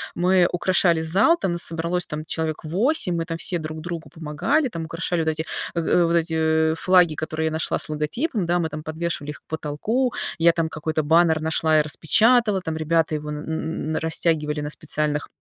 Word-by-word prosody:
мы 180 Hz, 0 st, +3 dB
украшали 175 Hz, -2 st, +2 dB
зал, 195 Hz, -, +3 dB
там 190 Hz, -, -2 dB
нас 170 Hz, -, 0 dB
собралось 170 Hz, +1 st, 0 dB
там 150 Hz, 0 st, -6 dB
человек 160 Hz, -1 st, -2 dB
8, 185 Hz, -, +1 dB
мы 165 Hz, -1 st, -2 dB
там 165 Hz, -1 st, -4 dB
все 175 Hz, +1 st, +1 dB
друг 155 Hz, 0 st, -6 dB
другу 170 Hz, -1 st, -6 dB
помогали, 175 Hz, -, -1 dB
там 165 Hz, -7 st, -5 dB
украшали 165 Hz, +1 st, -2 dB
вот 160 Hz, -, 0 dB
эти, 160 Hz, 0 st, -1 dB, 0.3 s
э, 170 Hz, -, -1 dB
э, 175 Hz, +1 st, +2 dB
вот 170 Hz, -, 0 dB
эти, 160 Hz, -1 st, +1 dB
э, -, -, -2 dB
флаги, 180 Hz, -3 st, +4 dB
которые 155 Hz, +1 st, -3 dB
я -, -, -2 dB
нашла 160 Hz, +1 st, -1 dB
с -, -, -2 dB
логотипом, 185 Hz, -, -2 dB
да, 175 Hz, +1 st, +1 dB
мы 165 Hz, -2 st, -1 dB
там 155 Hz, 0 st, -7 dB
подвешивали 155 Hz, -2 st, -4 dB
их -, -, -12 dB
к -, -, -55 dB
потолку, 185 Hz, -, -2 dB, 0.2 s
я 170 Hz, 0 st, +4 dB
там 165 Hz, -1 st, -1 dB
какой-то 155 Hz, 0 st, -2 dB
баннер 160 Hz, +1 st, +3 dB
нашла 160 Hz, 0 st, +1 dB
и -, -, +5 dB
распечатала, 210 Hz, +7 st, +3 dB
там 160 Hz, -3 st, -4 dB
ребята 160 Hz, 0 st, +1 dB
его 150 Hz, 0 st, -5 dB
н 150 Hz, -, -4 dB
н 160 Hz, 0 st, -3 dB
на 160 Hz, -, -1 dB
растягивали 160 Hz, -2 st, 0 dB
на 145 Hz, -, -4 dB
специальных 150 Hz, 0 st, -2 dB
160 Hz, 205 wpm, -23 LUFS, 155-175 Hz, 0.3 s, и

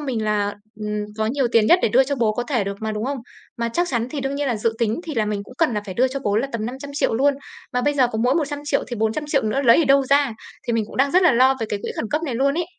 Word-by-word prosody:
mình 250 Hz, -7 st, -2 dB
là, 205 Hz, -1 st, 0 dB, 0.3 s
ừm, 210 Hz, 0 st, -2 dB
có 215 Hz, -, +1 dB
nhiều 260 Hz, +2 st, +1 dB
tiền 220 Hz, -2 st, +4 dB
nhất 355 Hz, -, +6 dB
để -, -, +3 dB
đưa 260 Hz, +5 st, +4 dB
cho 280 Hz, +2 st, -2 dB
bố 225 Hz, -3 st, +2 dB
có 245 Hz, -, -2 dB
thể 240 Hz, -5 st, -1 dB
được 200 Hz, 0 st, -4 dB
mà, 220 Hz, 0 st, -2 dB
đúng 215 Hz, +2 st, -3 dB
không? 275 Hz, 0 st, -2 dB, 0.4 s
Mà 235 Hz, 0 st, -1 dB
chắc 350 Hz, +8 st, 0 dB
chắn 235 Hz, -4 st, -1 dB
thì 290 Hz, -, -4 dB
đương 270 Hz, +1 st, -2 dB
nhiên 285 Hz, 0 st, -2 dB
là 235 Hz, -, 0 dB
dự 225 Hz, +2 st, 0 dB
tính 230 Hz, +4 st, 0 dB
thì 315 Hz, -4 st, -5 dB
là 220 Hz, -2 st, +1 dB
mình 210 Hz, -1 st, -2 dB
cũng 250 Hz, -, -14 dB
cần 305 Hz, -9 st, +2 dB
là 210 Hz, -, 0 dB
phải 190 Hz, -3 st, -7 dB
đưa 260 Hz, +2 st, +3 dB
cho 275 Hz, +1 st, -4 dB
bố 205 Hz, -5 st, 0 dB
là 255 Hz, +5 st, +1 dB
tầm 220 Hz, -1 st, -2 dB
500.000.000 270 Hz, -1 st, -2 dB
luôn, 280 Hz, +4 st, +3 dB, 0.4 s
mà 250 Hz, -, +1 dB
bây 290 Hz, 0 st, +1 dB
giờ 255 Hz, -3 st, +3 dB
có 220 Hz, -, -2 dB
mỗi 255 Hz, +3 st, +3 dB
100.000.000 290 Hz, -2 st, -1 dB
thì 240 Hz, -, -4 dB
400.000.000 275 Hz, +7 st, 0 dB
nữa 240 Hz, +6 st, 0 dB
lấy 235 Hz, +2 st, +6 dB
ở 325 Hz, -, +4 dB
đâu 275 Hz, 0 st, +5 dB
ra, 280 Hz, -2 st, +3 dB, 0.3 s
thì 235 Hz, -, 0 dB
mình 225 Hz, -2 st, +1 dB
cũng -, -, -11 dB
đang 275 Hz, +1 st, +3 dB
rất 370 Hz, +1 st, +4 dB
là 355 Hz, -, +5 dB
lo 260 Hz, +3 st, +5 dB
về 225 Hz, -, -1 dB
cái 205 Hz, -, -2 dB
quỹ -, -, -4 dB
khẩn -, -, -2 dB
cấp 305 Hz, +2 st, 0 dB
này 270 Hz, -7 st, -3 dB
luôn 275 Hz, +3 st, +1 dB
ấy! 345 Hz, +1 st, 0 dB
250 Hz, 320 wpm, -22 LUFS, 220-280 Hz, 0.4 s, nhất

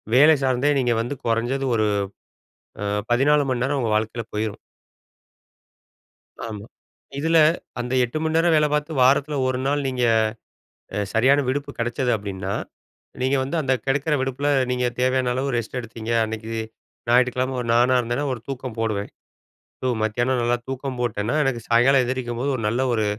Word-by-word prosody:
வேலை 150 Hz, +4 st, +7 dB
சார்ந்தே 130 Hz, +2 st, +2 dB
நீங்க 120 Hz, -2 st, +1 dB
வந்து 125 Hz, +5 st, -4 dB
கொறைஞ்சது 120 Hz, +4 st, 0 dB
ஒரு 110 Hz, -, +2 dB, 1.0 s
அ -, -, -2 dB, 0.3 s
14 145 Hz, +4 st, +4 dB
மணி 125 Hz, -2 st, -1 dB
நேரம் 140 Hz, +1 st, 0 dB
உங்க 115 Hz, -, -1 dB
வாழ்க்கையில 110 Hz, +1 st, -3 dB
போயிரும். 105 Hz, -1 st, -2 dB, 1.9 s
ஆமா, 105 Hz, -3 st, -6 dB, 0.5 s
இதில 165 Hz, +3 st, +2 dB, 0.4 s
அந்த 125 Hz, +1 st, -4 dB
8 125 Hz, +6 st, -3 dB
மண் 160 Hz, 0 st, -1 dB
நேரம் 165 Hz, 0 st, +4 dB
வேல 150 Hz, -1 st, +4 dB
பார்த்து, 150 Hz, +1 st, -1 dB
வாரத்தில 140 Hz, +3 st, +3 dB
1 130 Hz, 0 st, 0 dB
நாள் 145 Hz, 0 st, 0 dB
நீங்க, 125 Hz, -1 st, -1 dB, 1.1 s
சரியான 130 Hz, +6 st, +4 dB
விடுப்பு 140 Hz, +2 st, -2 dB
கிடைச்சது 120 Hz, +2 st, 0 dB
அப்டின்னா, 100 Hz, -2 st, -4 dB, 0.7 s
நீங்க 130 Hz, +2 st, +2 dB
வந்து 140 Hz, +6 st, -4 dB
அந்த 135 Hz, -2 st, +1 dB
கிடைக்கிற 145 Hz, +3 st, +1 dB
விடுப்பில 135 Hz, +2 st, -1 dB, 0.2 s
நீங்க 125 Hz, 0 st, 0 dB
தேவையான 130 Hz, 0 st, +2 dB
அளவு 135 Hz, +1 st, -1 dB
ரெஸ்ட் 120 Hz, +2 st, -4 dB
எடுத்தீங்க, 115 Hz, -1 st, -6 dB
அன்னைக்கு 110 Hz, 0 st, -6 dB, 0.6 s
ஞாயிற்றுக்கிழமை 125 Hz, +1 st, +2 dB
ஒரு 120 Hz, -, -5 dB
நானா 125 Hz, +2 st, +4 dB
இருந்தேனா, 120 Hz, +4 st, -2 dB
ஒரு 115 Hz, -, -7 dB
தூக்கம் 130 Hz, -3 st, -5 dB
போடுவேன். 105 Hz, -3 st, -2 dB, 0.7 s
ஸோ 130 Hz, -, 0 dB
மத்தியானம் 120 Hz, +4 st, 0 dB
நல்லா 120 Hz, +1 st, +2 dB
தூக்கம் 135 Hz, 0 st, -4 dB
போட்டேன்னா, 115 Hz, 0 st, -1 dB
எனக்கு 135 Hz, -4 st, 0 dB
சாயங்காலம் 125 Hz, +3 st, +5 dB
எந்திரிக்கும்போது 125 Hz, +1 st, -2 dB
ஒரு 115 Hz, -, -5 dB
நல்ல 120 Hz, +4 st, 0 dB
ஒரு 110 Hz, -2 st, +1 dB
125 Hz, 150 wpm, -23 LUFS, 115-135 Hz, 1.9 s, வேலை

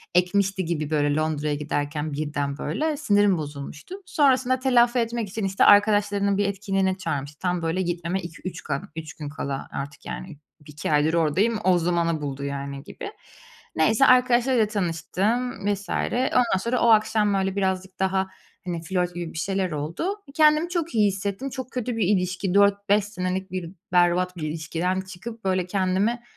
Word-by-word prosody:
ekmişti 190 Hz, +1 st, +2 dB
gibi, 155 Hz, -3 st, -2 dB
böyle, 145 Hz, -2 st, +1 dB
Londra'ya 155 Hz, -1 st, 0 dB
giderken 150 Hz, +1 st, -3 dB
birden, 145 Hz, -1 st, -2 dB
böyle, 300 Hz, -, -1 dB
sinirim 205 Hz, -, +3 dB
bozulmuştu. 145 Hz, -, -7 dB
Sonrasında 260 Hz, -, +2 dB
telafi 250 Hz, -1 st, +3 dB
etmek 230 Hz, -2 st, -2 dB
için, 205 Hz, +1 st, -3 dB
işte, 195 Hz, 0 st, +2 dB
arkadaşlarının 205 Hz, -1 st, +4 dB
bir 205 Hz, -, +2 dB
etkinliğe 195 Hz, -1 st, 0 dB
çağırmıştı. 145 Hz, -5 st, -4 dB
Tam, 180 Hz, -1 st, -1 dB
böyle, 165 Hz, +3 st, 0 dB
gitmeme 175 Hz, +1 st, -2 dB
2-3 170 Hz, +2 st, -7 dB
ka 140 Hz, 0 st, -2 dB
3 160 Hz, -1 st, -6 dB
gün 150 Hz, -2 st, -7 dB
kala 140 Hz, -2 st, -4 dB
artık, 140 Hz, +1 st, -6 dB
yani, 180 Hz, -5 st, -7 dB, 0.3 s
2 150 Hz, +2 st, -5 dB
aydır 150 Hz, +2 st, +3 dB
oradayım, 175 Hz, +8 st, +2 dB
o 185 Hz, -1 st, +4 dB
zamanı 170 Hz, -2 st, 0 dB
buldu, 140 Hz, -1 st, -4 dB
yani, 140 Hz, 0 st, -5 dB
gibi. -, -, -8 dB, 0.6 s
Neyse, 220 Hz, +11 st, +4 dB
arkadaşlarıyla 250 Hz, -2 st, +4 dB
tanıştım, 205 Hz, +4 st, -1 dB
vs. 200 Hz, 0 st, -8 dB
Ondan 250 Hz, -4 st, +1 dB
sonra 235 Hz, +5 st, -1 dB
o 235 Hz, -, +4 dB
akşam, 215 Hz, -1 st, +4 dB
böyle, 195 Hz, 0 st, 0 dB
birazcık 190 Hz, -1 st, -2 dB
daha, 190 Hz, 0 st, +1 dB, 0.4 s
hani, 175 Hz, -2 st, -3 dB
flört 180 Hz, +1 st, -1 dB
gibi 175 Hz, -2 st, -5 dB
bir -, -, -8 dB
şeyler 190 Hz, +2 st, -1 dB
oldu. 165 Hz, -, -2 dB, 0.2 s
Kendimi 305 Hz, +2 st, +4 dB
çok 335 Hz, -4 st, -2 dB
iyi 210 Hz, -2 st, +5 dB
hissettim, 200 Hz, +6 st, -3 dB
çok 260 Hz, 0 st, -7 dB
kötü 250 Hz, -1 st, -3 dB
bir 210 Hz, -5 st, +1 dB
ilişki, 185 Hz, -1 st, 0 dB
4-5 200 Hz, 0 st, +3 dB
senelik 190 Hz, -2 st, -3 dB
bir 180 Hz, -3 st, -4 dB, 0.2 s
berbat 180 Hz, +1 st, +3 dB
bir 160 Hz, -, -5 dB
ilişkiden 165 Hz, +4 st, -2 dB
çıkıp, 190 Hz, +5 st, -9 dB
böyle, 185 Hz, -2 st, +1 dB
kendimi, 195 Hz, +5 st, 0 dB
190 Hz, 160 wpm, -24 LUFS, 165-210 Hz, 0.6 s, iyi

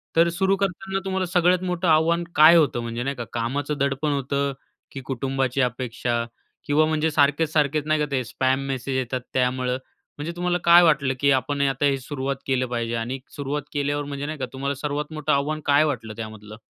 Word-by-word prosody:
तर 165 Hz, +1 st, +5 dB
सुरू 190 Hz, +3 st, +1 dB
करताना 195 Hz, 0 st, -2 dB
तुम्हाला 190 Hz, -1 st, -1 dB
सगळ्यात 180 Hz, 0 st, +2 dB
मोठं 180 Hz, -1 st, -1 dB
आव्हान 165 Hz, +2 st, +3 dB
काय 155 Hz, +3 st, +8 dB
होतं 145 Hz, -7 st, +3 dB
म्हणजे 115 Hz, +1 st, -4 dB
नाही 140 Hz, +2 st, -2 dB
का 120 Hz, -, -5 dB
कामाचं 140 Hz, +5 st, -2 dB
दडपण 140 Hz, +2 st, 0 dB
होतं, 140 Hz, 0 st, -1 dB, 0.4 s
की 135 Hz, -, -7 dB
कुटुंबाची 135 Hz, 0 st, -1 dB
अपेक्षा? 120 Hz, -1 st, -1 dB, 0.4 s
किंवा 150 Hz, +1 st, +3 dB
म्हणजे 155 Hz, 0 st, 0 dB
सारखेच-सारखेच 150 Hz, 0 st, +2 dB
नाही 155 Hz, 0 st, +2 dB
का 150 Hz, -, +1 dB
ते 130 Hz, -2 st, 0 dB
स्पॅम 130 Hz, +3 st, 0 dB
मेसेज 130 Hz, 0 st, -3 dB
येतात 130 Hz, 0 st, -2 dB
त्यामुळं, 125 Hz, 0 st, 0 dB, 0.4 s
म्हणजे 150 Hz, +3 st, -4 dB
तुम्हाला 175 Hz, 0 st, 0 dB
काय 170 Hz, +1 st, +8 dB
वाटलं 145 Hz, -5 st, +3 dB
की 140 Hz, 0 st, +3 dB
आपण 140 Hz, +2 st, 0 dB
आता 140 Hz, +1 st, +1 dB
हे 140 Hz, -1 st, +2 dB
सुरुवात 135 Hz, 0 st, -3 dB
केलं 130 Hz, -1 st, +1 dB
पाहिजे? 120 Hz, -1 st, -2 dB
आणि 120 Hz, +3 st, -3 dB, 0.2 s
सुरुवात 145 Hz, 0 st, -3 dB
केल्यावर 145 Hz, 0 st, -1 dB
म्हणजे 140 Hz, 0 st, -5 dB
नाही 155 Hz, +1 st, -4 dB
का 130 Hz, -, -1 dB
तुम्हाला 140 Hz, +1 st, -2 dB
सर्वात 150 Hz, +2 st, -4 dB
मोठं 155 Hz, -2 st, -1 dB
आव्हान 145 Hz, +2 st, 0 dB
काय 145 Hz, +1 st, +5 dB
वाटलं 115 Hz, -8 st, -3 dB
त्यामधलं? 110 Hz, -1 st, -8 dB
140 Hz, 185 wpm, -24 LUFS, 130-155 Hz, 0.4 s, काय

